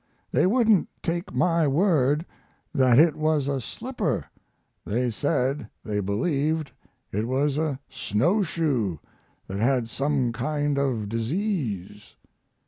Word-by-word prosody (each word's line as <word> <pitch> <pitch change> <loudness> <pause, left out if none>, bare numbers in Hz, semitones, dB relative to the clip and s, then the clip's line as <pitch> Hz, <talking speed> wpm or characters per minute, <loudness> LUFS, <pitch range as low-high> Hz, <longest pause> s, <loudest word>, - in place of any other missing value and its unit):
They - - +3
wouldn't 220 -3 +3
take 170 +2 -2
my 170 -3 +2
word 150 -1 +2 0.5
that 130 -3 +4
it 155 0 +6
was 155 -2 +1
a 140 -2 -1
slipper; 205 - -3 0.6
they 120 +3 0
said 130 0 -1
they 105 -2 -2
believed 145 - 0 0.4
it 105 +3 -1
was 140 +3 +1
a 155 -4 -1
snow 165 - +1
shoe 135 - 0 0.5
that 95 +1 -5
had 120 0 +1
some 135 -4 0
kind 145 +3 -1
of 125 -7 0
disease. 115 - -3
140 Hz, 120 wpm, -25 LUFS, 115-160 Hz, 0.6 s, it